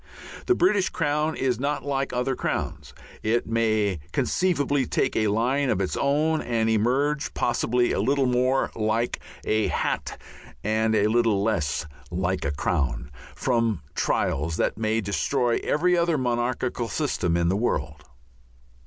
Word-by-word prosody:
The 370 - +4
British 205 - +3
crown 150 -1 0
is 125 -3 0
not 140 0 -2
like 135 -1 -1
other 125 +1 -1
crowns; - - -3 0.3
it 115 +2 +1
may 110 -5 +1
conceivably 145 -7 +1
take - - 0
a 110 - +2
line 125 +6 +1
of 100 - +1
its 95 - -1
own 155 +3 +1
and 115 -2 0
emerge 135 +7 +1
possibly 120 0 +1
a - - 0
little 140 0 +2
more 125 +1 +1
like 110 +2 0 0.3
a 110 0 +1
hat - - -2 0.4
and 110 +1 +1
a 105 -1 +3
little 110 -2 +2
less 85 -8 0 0.2
like 90 0 -1
a 70 - 0
crown 70 -1 -1 0.2
from 115 - 0
trials 80 +3 0
that - - 0
may 110 +1 0
destroy 120 +4 0
every 180 +4 +2
other 170 -2 +2
monarchial 120 -1 -1
system 85 -2 0
in 85 -1 +1
the 95 - +1
world. 75 - -2
120 Hz, 145 wpm, -25 LUFS, 105-135 Hz, 0.4 s, The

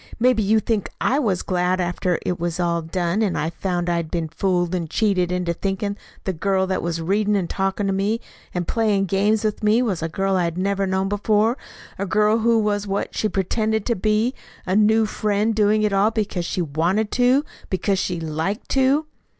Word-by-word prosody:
"Maybe 245 -1 +3
you 215 +2 +3
think 215 -2 -1
I 270 +4 +2
was 205 -10 0
glad 180 0 0
after 175 0 0
it 180 - -1
was 175 +1 -2
all 170 -1 +1
done, 175 +4 -1
and 200 -5 0
I 155 +3 -1
found 175 -1 -2
I'd 170 -2 -1
been 165 -2 -2
fooled 175 +1 0
and 170 -3 -2
cheated 185 -3 +1
into 180 -1 -1
thinking 195 +3 -2 0.3
the 190 - -2
girl 190 +3 +1
that 190 0 -1
was 170 -1 -2
reading 205 +5 +1
and 190 -4 0
talking 195 +2 -1
to 195 - +1
me 200 +4 0 0.3
and 180 -1 -3
playing 210 -4 +1
games 205 +3 +1
with 215 -1 -1
me 215 +3 +3
was 195 -9 -1
a 165 - -2
girl 195 +3 0
I 180 - +1
had 170 0 -3
never 195 +1 0
known 190 +1 0
before 210 +3 +2 0.4
a 200 - -2
girl 215 +3 +3
who 230 +1 +3
was 205 -1 0
what 200 +1 -2
she 215 - 0
pretended 215 +3 0
to 235 - +1
be, 215 +5 +1 0.3
a 185 - 0
new 220 +1 +4
friend 210 +1 0
doing 215 0 +3
it 210 -1 +1
all 200 +2 +4
because 210 -5 -2
she 180 - -1
wanted 170 +8 0
to, 255 +4 +3 0.2
because 190 +1 0
she 180 -3 -2
liked 160 +6 -3
to." 275 +3 +2
195 Hz, 205 wpm, -22 LUFS, 180-215 Hz, 0.4 s, new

